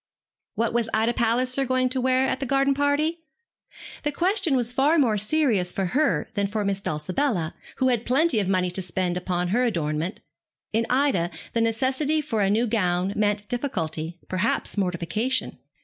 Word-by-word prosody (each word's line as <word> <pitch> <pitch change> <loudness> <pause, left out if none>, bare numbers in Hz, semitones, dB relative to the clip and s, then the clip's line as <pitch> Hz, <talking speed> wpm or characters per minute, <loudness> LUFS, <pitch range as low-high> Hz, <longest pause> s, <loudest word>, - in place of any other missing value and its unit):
What 230 0 0
was 235 -1 0
Ida 225 +2 +2
Palliser 250 +3 +1
going 255 0 +1
to 255 0 0
wear 260 +1 +2
at 260 - -1
the 270 - -3
garden 275 +1 +2
party? 285 +4 +1 0.8
The 295 - -1
question 360 0 +1
was 240 -2 +2
far 285 +6 +3
more 245 -8 +3
serious 210 - +1
for 195 - -2
her 300 +2 +1
than 200 -3 0
for 210 0 -2
Miss 195 0 -1
Dulcibella, 170 - -1 0.2
who 260 - +2
had 240 -3 +1
plenty 270 0 +2
of 200 - -1
money 185 -2 +1
to 190 - -2
spend 180 0 -1
upon 180 -1 -2
her 235 +7 +2
adornment. 165 -6 -1 0.5
In 225 +1 +1
Ida 255 -10 +2 0.2
the 230 - +1
necessity 260 +7 +1
for 250 -8 -1
a 195 - +2
new 220 +4 +2
gown 185 -4 0
meant 210 0 0
difficulty, 170 - -3
perhaps 185 +4 -1
mortification. 195 +7 -1
230 Hz, 170 wpm, -25 LUFS, 185-265 Hz, 0.8 s, far